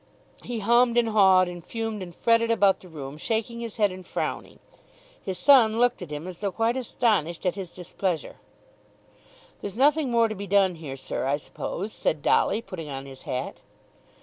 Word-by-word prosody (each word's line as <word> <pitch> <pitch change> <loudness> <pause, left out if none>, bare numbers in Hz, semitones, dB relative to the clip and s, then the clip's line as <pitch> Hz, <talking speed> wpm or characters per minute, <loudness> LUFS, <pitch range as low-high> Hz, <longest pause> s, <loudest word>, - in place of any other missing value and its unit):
He 235 -3 -5
hummed 235 +2 +4
and 235 -1 +3
hawed, 190 -4 +5
and 175 -1 -8
fumed 225 -1 -4
and 175 -2 -8
fretted 230 0 +2
about 200 -4 +3
the 185 - -14
room, 145 -3 -8
shaking 225 +6 -2
his 230 -2 -6
head 205 -3 +3
and 185 0 -9
frowning. - - -4 0.7
His 190 -2 -4
son 230 -1 +5
looked 245 -2 +2
at 180 - -7
him 150 +2 -6
as 180 -2 -8
though 200 -2 -2
quite 225 +4 0
astonished 210 - 0
at 180 - +2
his 190 -3 -6
displeasure. 180 -2 -4 1.2
"There's 205 +1 -6
nothing 290 +1 +3
more 230 -1 +3
to 215 - -4
be 200 -1 -7
done 195 -1 +3
here, 150 -5 -8
sir, 130 - -4
I 140 +1 +1
suppose," 195 +7 -6
said 150 -2 -1
Dolly 220 +3 +2
putting 175 -6 -7
on 135 -1 -6
his 135 -1 -11
hat. 130 0 -4
200 Hz, 185 wpm, -26 LUFS, 175-230 Hz, 1.2 s, hawed